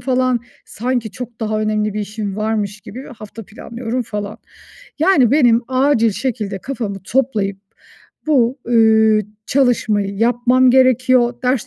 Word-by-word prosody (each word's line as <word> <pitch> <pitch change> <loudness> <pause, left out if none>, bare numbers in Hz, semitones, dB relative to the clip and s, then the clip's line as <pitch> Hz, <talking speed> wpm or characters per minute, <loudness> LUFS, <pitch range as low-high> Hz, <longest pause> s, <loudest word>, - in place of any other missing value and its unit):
falan. 255 -1 0 0.2
Sanki 240 -1 -3
çok 240 +1 -9
daha 215 -1 -1
önemli 215 -1 -1
bir 215 - -2
işim 205 -1 -5
varmış 215 -1 -2
gibi 255 +7 -10
hafta 215 +1 -10
planlıyorum 235 +3 -5
falan. 210 -2 -6 0.6
Yani, 310 - +4
benim 245 -5 +4
acil 255 -3 +2
şekilde 210 -4 -3
kafamı 220 -5 -5
toplayıp 220 -6 -1 0.7
bu, 265 -3 +2
ııı, 220 -2 +4 0.3
çalışmayı 225 -6 +1
yapmam 245 +2 +3
gerekiyor, 255 -1 +3
ders 255 0 0
230 Hz, 125 wpm, -18 LUFS, 215-255 Hz, 0.7 s, Yani